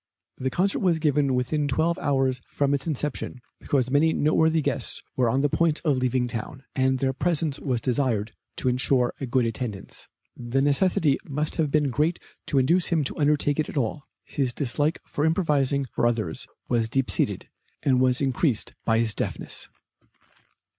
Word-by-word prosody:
The 130 Hz, -, -1 dB
concert 190 Hz, +8 st, +1 dB
was 175 Hz, -4 st, +2 dB
given 145 Hz, -4 st, +1 dB
within 145 Hz, +4 st, 0 dB
twelve 160 Hz, +5 st, +1 dB
hours 135 Hz, -3 st, 0 dB
from 140 Hz, 0 st, 0 dB
its 140 Hz, +1 st, -2 dB
inception, 150 Hz, -3 st, -3 dB, 0.2 s
because 130 Hz, -3 st, 0 dB
many 155 Hz, +3 st, +3 dB
noteworthy 160 Hz, +2 st, +2 dB
guests 140 Hz, -4 st, -2 dB, 0.2 s
were 125 Hz, -3 st, +2 dB
on 130 Hz, +4 st, +1 dB
the 145 Hz, -, +3 dB
point 160 Hz, +2 st, +1 dB
of 145 Hz, -4 st, +3 dB
leaving 130 Hz, 0 st, +1 dB
town, 120 Hz, +2 st, -5 dB
and 130 Hz, 0 st, +2 dB
their 135 Hz, 0 st, 0 dB
presence 160 Hz, -1 st, 0 dB
was 130 Hz, -4 st, -1 dB
desired 115 Hz, -4 st, 0 dB, 0.2 s
to -, -, -2 dB
insure 125 Hz, 0 st, +2 dB
a 135 Hz, -, -2 dB
good 125 Hz, 0 st, +2 dB
attendance. 115 Hz, -3 st, -5 dB, 0.3 s
The 120 Hz, +2 st, -2 dB
necessity 145 Hz, +1 st, +2 dB
must 150 Hz, +2 st, -1 dB
have 155 Hz, -3 st, +1 dB
been 145 Hz, -1 st, +2 dB
great 155 Hz, +6 st, +1 dB, 0.3 s
to 140 Hz, -, 0 dB
induce 165 Hz, +7 st, +3 dB
him 165 Hz, -3 st, +1 dB
to 135 Hz, -, -4 dB
undertake 145 Hz, 0 st, +2 dB
it 155 Hz, -, 0 dB
at -, -, -6 dB
all. 135 Hz, +3 st, -2 dB, 0.2 s
His 130 Hz, -4 st, -2 dB
dislike 145 Hz, +4 st, 0 dB
for 145 Hz, -, -3 dB
improvising 145 Hz, -5 st, +1 dB
for 120 Hz, -, +1 dB
others 110 Hz, -9 st, -2 dB, 0.2 s
was 115 Hz, -2 st, +1 dB
deep 135 Hz, +2 st, 0 dB
seated, -, -, 0 dB, 0.3 s
and 130 Hz, -2 st, +3 dB
was 130 Hz, 0 st, +2 dB
increased 135 Hz, -2 st, +1 dB
by 115 Hz, -1 st, +2 dB
his 115 Hz, -2 st, +2 dB
deafness. -, -, -4 dB
135 Hz, 175 wpm, -25 LUFS, 125-150 Hz, 0.3 s, many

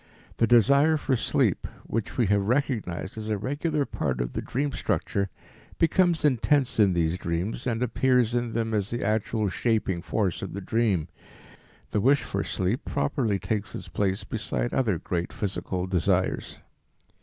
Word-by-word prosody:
The 115 Hz, -, +3 dB
desire 140 Hz, +7 st, +5 dB
for 140 Hz, -2 st, 0 dB
sleep -, -, +1 dB, 0.2 s
which 115 Hz, -1 st, -3 dB
we 120 Hz, -, +3 dB
have 100 Hz, 0 st, +3 dB
recognized 110 Hz, -7 st, -1 dB
as 110 Hz, 0 st, -5 dB
a 105 Hz, -, +1 dB
regular 145 Hz, -, -1 dB
part 65 Hz, -, -2 dB
of -, -, -2 dB
the -, -, -2 dB
dream 140 Hz, +3 st, -2 dB
structure 100 Hz, -6 st, -1 dB, 0.5 s
becomes 170 Hz, -1 st, +3 dB
intense 135 Hz, -1 st, +2 dB
in 100 Hz, -3 st, +5 dB
these 85 Hz, +1 st, 0 dB
dreams 90 Hz, +9 st, -2 dB
and 120 Hz, 0 st, 0 dB
appears 125 Hz, -1 st, +2 dB
in 120 Hz, -2 st, -1 dB
them 115 Hz, -1 st, -1 dB
as 105 Hz, -2 st, 0 dB
the 120 Hz, -, -3 dB
actual 110 Hz, +1 st, 0 dB
shaping 100 Hz, -3 st, 0 dB
force 95 Hz, 0 st, -1 dB
of 95 Hz, -, -5 dB
the 100 Hz, -, -4 dB
dream. 100 Hz, -5 st, +1 dB, 0.8 s
The 105 Hz, -, +1 dB
wish 140 Hz, +5 st, +4 dB
for -, -, -2 dB
sleep 95 Hz, +7 st, -1 dB
properly 120 Hz, -8 st, 0 dB
takes 100 Hz, +3 st, -3 dB
its -, -, -7 dB
place 95 Hz, 0 st, -1 dB
beside 115 Hz, +2 st, -3 dB
other 110 Hz, -9 st, +1 dB
great 85 Hz, +1 st, -3 dB
physical 95 Hz, -2 st, -3 dB
desires. 95 Hz, 0 st, 0 dB
110 Hz, 160 wpm, -26 LUFS, 95-125 Hz, 0.8 s, desire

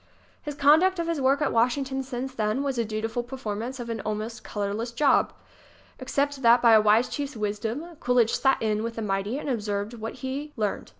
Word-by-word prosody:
His 295 Hz, -1 st, -6 dB
conduct 315 Hz, +7 st, +4 dB
of 340 Hz, -, -1 dB
his 330 Hz, -4 st, -2 dB
work 275 Hz, +3 st, +3 dB
at -, -, +1 dB
Washington 265 Hz, +3 st, +1 dB
since 260 Hz, 0 st, -5 dB
then 220 Hz, +3 st, -1 dB
was 270 Hz, -3 st, -2 dB
a -, -, +2 dB
dutiful 220 Hz, +2 st, -3 dB
performance 240 Hz, 0 st, -5 dB
of 240 Hz, -, -5 dB
an 225 Hz, -, -4 dB
almost 215 Hz, +1 st, -4 dB
colorless 210 Hz, +3 st, -3 dB
job 280 Hz, +4 st, +3 dB
ŌĆö -, -, -26 dB, 0.7 s
except 280 Hz, +1 st, -1 dB
that 235 Hz, 0 st, +6 dB
by 235 Hz, -1 st, +6 dB
a 215 Hz, -, +7 dB
wise 215 Hz, +3 st, +4 dB
chief's 285 Hz, -3 st, -5 dB
wisdom 220 Hz, +7 st, -3 dB
Coolidge 245 Hz, -2 st, +2 dB
"sat 270 Hz, -1 st, +2 dB
in" 215 Hz, -1 st, 0 dB
with 230 Hz, 0 st, -4 dB
the 225 Hz, -, -4 dB
mighty 200 Hz, +4 st, -1 dB
and 295 Hz, -, -6 dB
absorbed 210 Hz, -3 st, -2 dB
what 225 Hz, -1 st, -6 dB
he 285 Hz, +3 st, -4 dB
learned. 210 Hz, -2 st, -2 dB
240 Hz, 200 wpm, -26 LUFS, 215-270 Hz, 0.7 s, a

